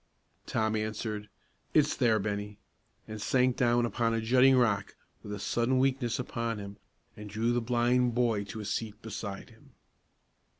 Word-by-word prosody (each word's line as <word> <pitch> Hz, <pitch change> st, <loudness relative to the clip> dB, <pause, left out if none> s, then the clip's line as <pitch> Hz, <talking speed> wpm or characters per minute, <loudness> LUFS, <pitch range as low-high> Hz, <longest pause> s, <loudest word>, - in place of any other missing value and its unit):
Tom 110 Hz, 0 st, 0 dB
answered: 110 Hz, -1 st, -3 dB, 0.5 s
"It's 150 Hz, -1 st, +4 dB
there, 115 Hz, -4 st, +3 dB
Bennie," 105 Hz, 0 st, -3 dB, 0.5 s
and 110 Hz, -1 st, -7 dB
sank 125 Hz, +1 st, +2 dB
down 120 Hz, -1 st, +3 dB
upon 115 Hz, -1 st, 0 dB
a -, -, 0 dB
jutting 130 Hz, +3 st, +5 dB
rock, 100 Hz, -6 st, +1 dB, 0.3 s
with 105 Hz, -, -9 dB
a 105 Hz, -, -3 dB
sudden 120 Hz, +5 st, 0 dB
weakness 130 Hz, -2 st, +1 dB
upon 115 Hz, -2 st, -3 dB
him, 100 Hz, 0 st, -8 dB, 0.4 s
and 105 Hz, 0 st, -9 dB
drew 110 Hz, +3 st, 0 dB
the 120 Hz, -, +1 dB
blind 120 Hz, +1 st, +2 dB
boy 115 Hz, -4 st, +1 dB
to 110 Hz, +2 st, -7 dB
a -, -, -7 dB
seat 105 Hz, +1 st, -3 dB
beside 105 Hz, -2 st, -6 dB
him. -, -, -21 dB
115 Hz, 160 wpm, -30 LUFS, 105-120 Hz, 0.5 s, jutting